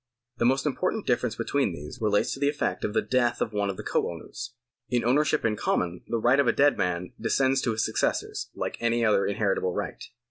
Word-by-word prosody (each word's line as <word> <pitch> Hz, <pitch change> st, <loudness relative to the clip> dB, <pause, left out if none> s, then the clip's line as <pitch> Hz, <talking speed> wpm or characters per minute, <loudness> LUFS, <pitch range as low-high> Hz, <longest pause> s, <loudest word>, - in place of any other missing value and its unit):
The 120 Hz, -, +1 dB
most 135 Hz, +3 st, +2 dB
important 185 Hz, +8 st, -1 dB
difference 125 Hz, -2 st, 0 dB
between 120 Hz, -3 st, 0 dB
these 75 Hz, +3 st, -9 dB
relates 105 Hz, -2 st, +2 dB
to -, -, -7 dB
the 140 Hz, 0 st, +3 dB
effect 145 Hz, -, -2 dB
of 105 Hz, -, -2 dB
the -, -, +2 dB
death 120 Hz, -2 st, +1 dB
of 110 Hz, -, -1 dB
one 100 Hz, -1 st, 0 dB
of 95 Hz, -, -4 dB
the -, -, -6 dB
co -, -, 0 dB
owners. 115 Hz, +8 st, -8 dB, 0.3 s
In 120 Hz, -2 st, 0 dB
ownership 150 Hz, +4 st, +2 dB
in 110 Hz, -2 st, +2 dB
common 90 Hz, -3 st, -1 dB
the 115 Hz, -, -1 dB
right 120 Hz, +5 st, +3 dB
of 140 Hz, -, +3 dB
a -, -, +6 dB
dead 145 Hz, +1 st, +4 dB
man 90 Hz, 0 st, -2 dB
descends 135 Hz, 0 st, +2 dB
to 120 Hz, -, 0 dB
his 110 Hz, -, 0 dB
successors -, -, -1 dB
like -, -, -3 dB
any 115 Hz, 0 st, +1 dB
other 105 Hz, -2 st, +3 dB
inheritable 100 Hz, -3 st, 0 dB
right. -, -, -4 dB
115 Hz, 220 wpm, -27 LUFS, 100-135 Hz, 0.3 s, a